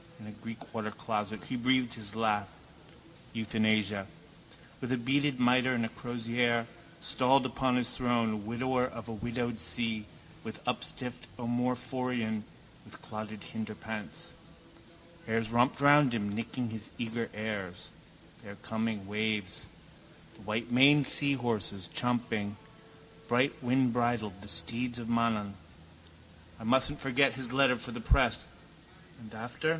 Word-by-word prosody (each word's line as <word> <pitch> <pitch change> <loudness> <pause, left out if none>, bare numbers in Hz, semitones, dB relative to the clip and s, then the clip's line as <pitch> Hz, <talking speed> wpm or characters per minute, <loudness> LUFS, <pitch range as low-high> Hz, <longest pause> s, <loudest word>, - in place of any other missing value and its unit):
In 110 - -11
a 105 - -8
Greek 110 +1 -8 0.2
watercloset 110 -2 -3
he 130 - -3
breathed 125 0 +2
his 105 -2 -3
last: 105 -3 +1 0.8
euthanasia. 110 -3 +1 0.7
With 125 -2 -2
beaded 140 0 +2
mitre 125 +1 +4
and 115 - +1
with 115 - -4
crozier, 120 0 0 0.3
stalled 130 +1 +4
upon 130 0 +1
his 125 0 +1
throne, 115 -4 +1
widower 125 +2 +1
of 115 -2 -8
a - - -4
widowed 120 +1 -2
see, 110 -3 -1 0.4
with - - -7
upstiffed 125 -1 -2
omophorion, 125 -2 -1 0.4
with - - -12
clotted 110 -1 -6
hinderparts. 110 0 -6 1.0
Airs 115 0 0
romped 120 +4 +3
round 145 -3 +6
him, 100 -2 -1
nipping 115 +2 -3
and 110 -1 -7
eager 115 0 -2
airs. 105 -4 -4 0.5
They - - -11
are 100 - -8
coming, 110 -1 -2
waves. 105 -1 -1 0.7
The - - -15
whitemaned 125 +7 +4
seahorses, 120 - +2
champing, 110 -4 0 0.7
brightwindbridled, 120 -4 +1
the 105 - -10
steeds 115 +8 0
of 120 - -5
Mananaan. 115 -4 +1 1.1
I - - -9
mustn't 130 +5 +3
forget 135 +1 +3
his 130 -2 -4
letter 135 -1 +5
for 115 - -5
the - - -5
press. - - +2 0.7
And 110 -2 -12
after? 120 +7 -2
115 Hz, 125 wpm, -31 LUFS, 110-125 Hz, 1.1 s, round